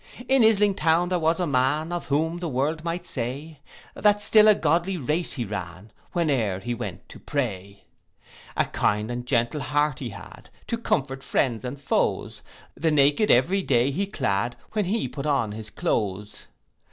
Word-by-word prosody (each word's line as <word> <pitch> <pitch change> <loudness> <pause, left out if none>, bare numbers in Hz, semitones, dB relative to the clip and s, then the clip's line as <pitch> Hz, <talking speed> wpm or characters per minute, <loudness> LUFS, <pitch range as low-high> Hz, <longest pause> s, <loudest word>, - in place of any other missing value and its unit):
In 265 -1 +4
Isling 210 -3 +4
town 165 +2 +2
there 180 -1 +1
was 165 +1 +1
a 180 - +1
man, 145 +3 +1
Of 175 0 -4
whom 160 +4 0
the 170 -2 -3
world 150 +4 -1
might 170 +1 -3
say, 140 +4 -4 0.3
That 205 -1 +3
still 210 +1 +5
a 215 - +7
godly 170 +3 +1
race 155 +4 -1
he 120 -5 -3
ran, 95 0 -7 0.2
Whene'er 130 - +1
he 120 +5 -3
went 120 - -6
to - - -11
pray. 100 -8 -4 0.7
A - - +3
kind 105 +2 0
and 120 0 -5
gentle 120 +3 0
heart 145 -1 0
he 125 - -4
had, 100 +1 -12 0.2
To 230 - -1
comfort 135 - -1
friends 125 -4 0
and 130 +2 -5
foes; 135 - -1 0.3
The 165 - 0
naked 145 +7 +3
every 175 +11 +4
day 130 -4 +2
he 195 +8 -1
clad, 120 - -1 0.2
When 210 -2 0
he 215 +5 -1
put 140 0 -5
on 135 -7 +1
his 110 +1 -7
cloaths. 105 -1 -3
145 Hz, 175 wpm, -25 LUFS, 120-170 Hz, 0.7 s, a